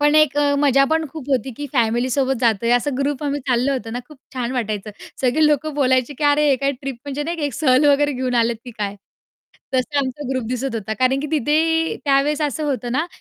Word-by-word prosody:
पण 295 +1 +4
एक 305 -2 +4
अ, 285 -1 +3
मजा 275 -1 +4
पण 320 +2 0
खूप 285 -1 -9
होती 265 -1 0
की 290 - -4
फॅमिली 240 0 +1
सोबत 270 0 +1
जातोय, 230 0 +2
असं 255 +2 +1
ग्रुप 280 +1 -1
आम्ही 285 0 -1
चाललं 255 +2 +2
होतं 245 -4 -3
ना 245 - -2
खूप 300 -3 -15 0.2
छान 250 -2 -3
वाटायचं. 215 -4 -3 0.3
सगळे 265 +5 +3
लोक 300 0 +2
बोलायचे 260 -1 +2
की - - -4
"अरे 290 0 +4
हे 275 - +4
काय 275 +2 0
ट्रिप 275 -1 -4
म्हणजे 285 +1 -3
नाही, 335 +3 -3
एक 285 - -3
सहल 265 0 +3
वगैरे 290 0 +4
घेऊन 255 -1 -2
आलेत 235 0 +2
की 245 - -8
काय?" 205 -2 -3 0.8
तसा 260 +3 0
आमचा 270 0 -3
ग्रुप 260 -2 -1
दिसत 255 0 -3
होता. 220 0 -3
कारण 255 +1 +2
की 300 - -3
तिथे 320 +2 +1
त्यावेळेस 285 +2 +2
असं 295 +1 -1
होतं 255 -4 -2
ना 305 +6 0
275 Hz, 225 wpm, -20 LUFS, 250-290 Hz, 0.8 s, पण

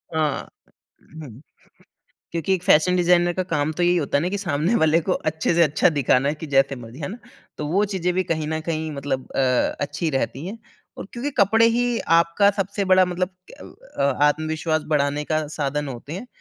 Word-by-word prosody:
हाँ। 155 -3 -1 0.8
हुँ, 125 -1 -11 0.9
क्योंकि 170 +3 -1
एक 180 -1 -2
फैशन 180 0 +4
डिज़ाइनर 175 0 +3
का 185 - -1
काम 150 -1 0
तो 175 - +1
यही 175 +1 +3
होता 140 -2 0
है - - 0
ना 180 - -1
कि 200 - -2
सामने 170 +3 0
वाले 160 -1 +3
को 185 - -2 0.2
अच्छे 160 +2 -1
से 170 0 +5
अच्छा 150 +3 +3
दिखाना 135 0 +2
है 155 - -2
कि 160 - -8
जैसे 135 0 +2
मर्ज़ी। 120 +3 -11
है 145 - -4
ना? 215 +6 -7 0.4
तो 150 - -4
वो 195 +6 +2
चीज़ें 180 -3 -2
भी 185 +1 +1
कहीं 155 -3 -2
न 160 0 -2
कहीं 160 -1 -3
मतलब 140 -2 -4
अ, 130 -2 +1
अच्छी 145 +3 -2
रहती 135 +2 -2
है 220 +4 -6 0.4
और - - -6
क्योंकि 255 +4 -3
कपड़े 225 +3 +5
ही 240 +1 +1 0.2
आपका 170 +4 +3
सबसे 200 0 -2
बड़ा 185 0 +5
मतलब 180 +1 -2 0.3
अ - - -11 0.4
अ, - - +2 0.2
आत्मविश्वास 155 +1 0
बढ़ाने 145 -1 0
का 155 -1 -1
साधन 150 -1 -3
होते 135 +4 -7
हैं। 215 +8 -7
160 Hz, 200 wpm, -22 LUFS, 145-185 Hz, 0.9 s, से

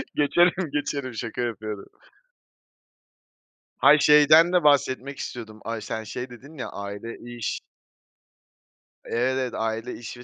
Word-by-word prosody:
Geçelim, 175 +3 +3
geçelim. 140 -3 -2
Şaka 115 +2 -5
yapıyorum. 110 -3 -4 1.9
Hayır, 150 - +6
şeyden 155 +4 +6
de 180 - +3
bahsetmek 140 -2 +2
istiyordum. 110 -3 -7
Ay, 115 -1 -4
sen 110 0 -5
şey 125 +4 -6
dedin 130 +6 -13
ya, 130 - -5
"Aile, 100 +3 -7 0.2
iş" 120 -3 -3 1.5
Evet, 130 0 -1
aile, 115 +2 -3
iş 120 +1 -9
ve 120 - -11
125 Hz, 115 wpm, -25 LUFS, 115-145 Hz, 1.9 s, Hayır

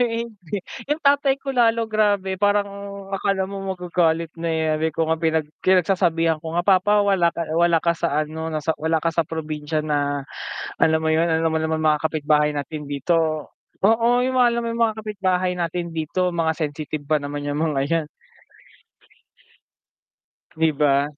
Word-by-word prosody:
kami 245 - +5 0.3
hindi. 210 - -22 0.5
Yung 300 +2 0
tatay 280 -1 +3
ko 275 - -5
lalo 230 -3 +2
grabe, 205 -3 +1
parang 205 0 +2 0.4
akala 195 -1 -1
mo 195 -1 -4
magagalit 170 -2 0
na, 170 0 -3
eh. 160 - 0 0.2
Sabi 160 +1 0
ko - - -9
nga 160 - +2
pinag 160 -2 +1 0.2
pinagsasabihan 175 -3 +2
ko 160 +1 -7
nga, 175 - +2
"Papa 200 +2 +4
wala 190 -4 +2
ka - - -3 0.2
wala 170 -1 +3
ka 170 -1 +1
sa 155 -3 0
ano, 160 +1 -5
nasa 155 +1 -1
wala 160 0 0
ka 165 - +1
sa 165 0 0
probinsya 155 -1 -3
na 145 -2 -1 0.6
alam 160 0 +3
mo 160 - 0
yun, 160 +1 +3
alam 165 -1 +1
mo 160 - 0
naman 160 0 -1
mga 155 -1 +3
kapitbahay 150 -1 +1
natin 150 +1 -5
dito, 155 +2 0 0.3
oo, 225 +3 +4
yung 255 +1 0
mga 245 - +6
alam 235 - -1
mo 235 - -3
yung 230 0 +1
mga 220 -1 -3
kapitbahay 185 -3 0
natin 170 0 -2
dito, 180 +4 0
mga 165 -2 0
sensitive 155 -1 -4
pa 155 - +4
naman 145 0 -5
yung 145 - -2
mga 150 -3 0
'yan." 165 -2 0 2.5
Di 160 -1 +2
ba? 140 -1 +2
165 Hz, 175 wpm, -22 LUFS, 155-195 Hz, 2.5 s, mga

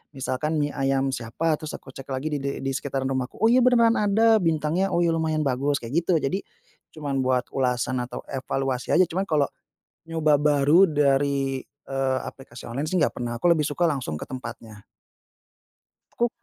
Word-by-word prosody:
misalkan 135 +4 -2
mie 145 -1 0
ayam 135 -1 0
siapa, 150 +7 -1
terus 155 - -6
aku 130 - -11
cek 135 +1 -11
lagi 135 +3 -3
de 140 0 -4
di 135 - -1
sekitaran 135 0 -3
rumahku, 130 -1 -3
"Oh 225 +3 +3
iya, 255 - +6
beneran 240 -2 +4
ada, 220 +2 +4
bintangnya 165 +2 0
oh 175 - +3
lumayan 160 -2 +1
bagus," 140 +2 0
kayak 155 +9 -1
gitu. 180 - +3
Jadi, 185 +8 0 0.6
cuman 145 -3 -2
buat 130 -1 +1
ulasan 125 -1 0
atau 125 0 -5
evaluasi 135 -1 -1
aja, 185 - +6
cuman 185 +3 -2
kalau 150 -3 +2 0.6
nyoba 155 -3 +2
baru 150 +5 +5
dari, 140 -2 +1
eee, 135 -2 -2
aplikasi 125 -3 -10
online 135 +6 -3
sih, 185 - -1
nggak 155 -5 +2
pernah. 120 -1 -4
Aku - - -12
lebih 150 -3 +1
suka 175 +4 -1
langsung 135 - -1
ke - - -6
tempatnya. 115 -4 -9 1.3
Aku 240 - +1
140 Hz, 170 wpm, -25 LUFS, 130-165 Hz, 1.3 s, iya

